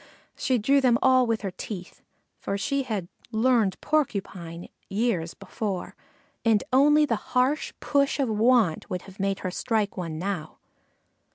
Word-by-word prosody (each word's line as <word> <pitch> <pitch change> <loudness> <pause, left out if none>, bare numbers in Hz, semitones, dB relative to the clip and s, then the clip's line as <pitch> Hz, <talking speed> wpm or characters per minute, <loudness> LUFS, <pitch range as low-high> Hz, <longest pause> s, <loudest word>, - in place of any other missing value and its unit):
She 255 - +1
drew 275 +6 +3
them 245 -3 +4
all 255 -1 +5
with 225 -1 0
her 195 - -2
teeth, 180 -1 -8 0.4
for 200 - -2
she 275 +8 0
had 215 -9 -3 0.2
"learned 225 -4 +2
Porcupine" 195 - -2 0.2
years 195 -6 -1
before, 195 -1 -4 0.5
and 225 -3 +3
only 295 +3 +6
the 235 - 0 0.2
hard 265 +5 +3 0.2
push 280 0 +1
of 275 - +2
want 220 -5 +2
would 180 - -3
have 195 0 -14
made 195 0 -1
her 185 - -3
strike 215 0 -1
one 165 -4 -4
now. 175 -3 -4
220 Hz, 150 wpm, -26 LUFS, 190-255 Hz, 0.5 s, only